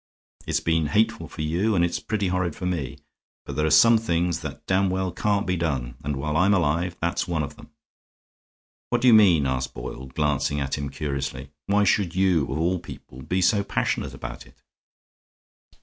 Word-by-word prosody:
It's - - +1
been 80 -2 +1
hateful 105 +10 +1
for 75 - -6
you 90 +8 0
and 85 -1 +3
it's 85 - -2
pretty 105 -4 -2
horrid 90 -3 -1
for 90 - -6
me. 85 -8 -3 0.5
But - - -6
there 75 0 +1
are - - +1
some 115 +6 +6
things 85 -5 0
that - - -8
damned 95 +1 +2
well 95 0 -1
can't 100 +3 0
be 90 - 0
done, 70 -8 -2
and 75 +1 -2
while 75 +3 -3
I'm 95 +4 +4
alive 85 +1 0
that's 85 +2 -1
one 85 -3 -1
of 70 - -6
them." - - -15 1.2
"What 120 0 0
do 130 - +3
you 120 - +8
mean?" 90 -9 +6
asked 65 0 -2
Boyle, 65 +2 -7
glancing 75 +1 0
at 70 -1 -2
him 70 -1 -4
curiously. 70 -2 -4 0.2
"Why 105 +1 +3
should 100 -4 +1
you, 95 -6 +3
of - - -2
all 90 +3 0
people, 65 -5 -11
be 90 +7 -1
so 100 +2 +3
passionate 100 - -2
about - - -8
it?" - - -23
85 Hz, 195 wpm, -24 LUFS, 75-95 Hz, 1.2 s, you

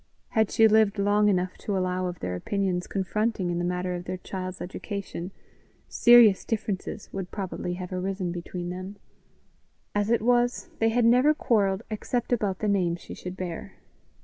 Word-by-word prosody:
Had 220 -2 +2
she 225 - +5
lived 215 -1 +4
long 205 +1 +3
enough 185 -1 0
to 200 -2 -2
allow 185 0 -1
of 175 -2 -6
their 90 - -2
opinions 185 - -1
confronting 200 -1 -1
in 175 - -1
the - - -1
matter 180 +1 -1
of 175 0 -5
their 185 +1 -4
child's 185 0 -6
education, 190 -1 -6 0.6
serious 235 -5 +6
differences 210 -2 -4
would 190 -2 -4
probably 185 -3 -4
have 180 0 -6
arisen 185 0 -2
between 175 0 -5
them; 185 +2 -6 1.0
as 205 0 0
it 235 -2 +2
was, 245 0 +1
they 225 - +3
had 235 +1 +2
never 250 +6 +5
quarrelled 205 -6 +1
except 240 +3 -2
about 205 -5 0
the 215 - -2
name 185 -4 +2
she 170 - -10
should 180 +1 -7
bear. 175 -3 -5
195 Hz, 170 wpm, -26 LUFS, 180-215 Hz, 1.0 s, serious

